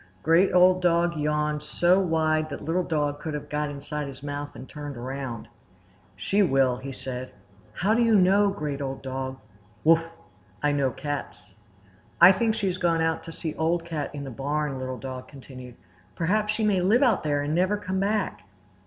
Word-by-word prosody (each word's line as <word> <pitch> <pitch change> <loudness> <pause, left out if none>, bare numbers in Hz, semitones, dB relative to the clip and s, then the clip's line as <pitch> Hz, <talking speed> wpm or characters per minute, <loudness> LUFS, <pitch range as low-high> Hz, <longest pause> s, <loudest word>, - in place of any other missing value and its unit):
Great 170 +4 +4
Old 180 0 +5
Dog 170 -1 +2
yawned 150 0 0
so 175 +4 +3
wide 155 -3 +1
that 140 0 -7
Little 170 +4 +1
Dog 150 -4 -1
could 155 -1 -4
have 150 - -6
got 150 0 -1
inside 145 +1 -5
his 135 0 -10
mouth 145 0 -5
and 130 - -9
turned 145 -3 -7
around. 125 -2 -5 0.7
"She 195 - +1
will!" 135 -8 +3
he 135 +2 -7
said. 130 -1 -6 0.4
"How 195 - +1
do 235 - +2
you 230 -2 +4
know, 200 +2 +5
Great 150 -7 -4
Old 135 -1 -4
Dog?" 130 0 -4 0.5
"Wuff! 165 +1 +6 0.6
I 145 - +3
know 140 -2 +1
cats." 145 -4 -6 0.7
"I 175 +2 +10
think 220 +3 +1
she 205 - -2
has 185 -1 -1
gone 165 -2 +2
out 160 0 0
to 165 - -7
see 160 -1 -5
Old 165 +1 0
Cat 155 -4 -3
in 140 - -5
the 135 - -6
Barn," 145 +1 -2
Little 130 0 -4
Dog 130 -1 -7
continued. 130 -3 -11 0.4
"Perhaps 210 +5 +1
she 220 +1 -2
may 200 -4 +2
live 215 +9 +4
out 245 -4 +3
there 145 -1 0
and 145 +1 -2
never 185 +5 +2
come 190 -2 -3
back." 205 - -1
150 Hz, 190 wpm, -26 LUFS, 140-180 Hz, 0.7 s, I